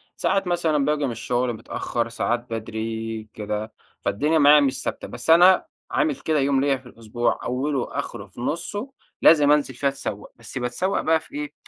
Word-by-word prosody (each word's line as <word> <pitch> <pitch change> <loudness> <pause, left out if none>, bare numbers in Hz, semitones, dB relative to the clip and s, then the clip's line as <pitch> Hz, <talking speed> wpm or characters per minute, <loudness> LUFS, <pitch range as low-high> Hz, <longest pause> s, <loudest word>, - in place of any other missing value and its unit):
ساعات 195 -1 0
مثلًا 160 -5 +1
باجي 150 0 +1
من 130 - -2
الشغل 120 +2 -1
متأخر 115 +1 -3
ساعات 120 +1 -1
بدري 110 0 -4
كده، 105 +1 -4 0.3
فالدنيا 150 +10 +1
معايا 145 +1 +8
مش 135 -2 0
ثابتة. - - -4
بس - - -7
أنا 180 +3 +7 0.3
عامل 305 -1 +1
كده 155 - 0
يوم 135 -1 +2
ليّا 140 -1 +2
في 130 - -19
الأسبوع، 120 0 -2
أوله 130 +1 -2
آخره - - -6
في - - -11
نُصّه 175 - -3 0.3
لازم 150 -3 +6
أنزل 145 -3 +2
فيه 140 +3 -1
أتسوّق، 135 -7 -4
بس 115 +2 -9
باتسوق 130 +11 -1
بقى 160 0 +3
في 160 - -15
إيه؟ 300 0 -4
135 Hz, 175 wpm, -23 LUFS, 115-160 Hz, 0.3 s, معايا